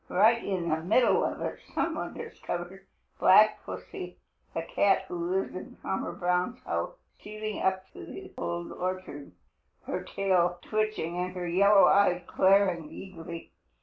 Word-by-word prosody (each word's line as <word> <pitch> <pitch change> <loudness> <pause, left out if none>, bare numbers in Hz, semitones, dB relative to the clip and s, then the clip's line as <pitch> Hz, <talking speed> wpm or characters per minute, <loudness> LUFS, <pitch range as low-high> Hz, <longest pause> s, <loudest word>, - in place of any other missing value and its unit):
Right 225 +5 +4
in 180 -4 -2
the 155 - +2
midst 210 +10 +3
of - - +1
it - - -3 0.2
some - - +1
one - - -5
discovered 185 +3 -6 0.3
Black 215 +3 +6
Pussy, 95 - -7 0.3
the 165 - -3
cat 195 +3 +2
who 175 -1 -3
lives 190 +1 -1
in 185 - -8
Farmer 190 - -3
Brown's 180 +7 0
house, - - -2 0.2
stealing 215 0 -5
up 190 0 0
through - - -11
the - - -9
Old 85 0 -4
Orchard, 185 -6 -5 0.5
her - - -3
tail 180 -3 +1
twitching 215 -6 -1
and 180 +1 -3
her 180 -1 -3
yellow 200 +3 +6
eyes 180 -3 +4
glaring 185 -5 +3
eagerly. 170 -3 -9
185 Hz, 150 wpm, -29 LUFS, 175-200 Hz, 0.5 s, Black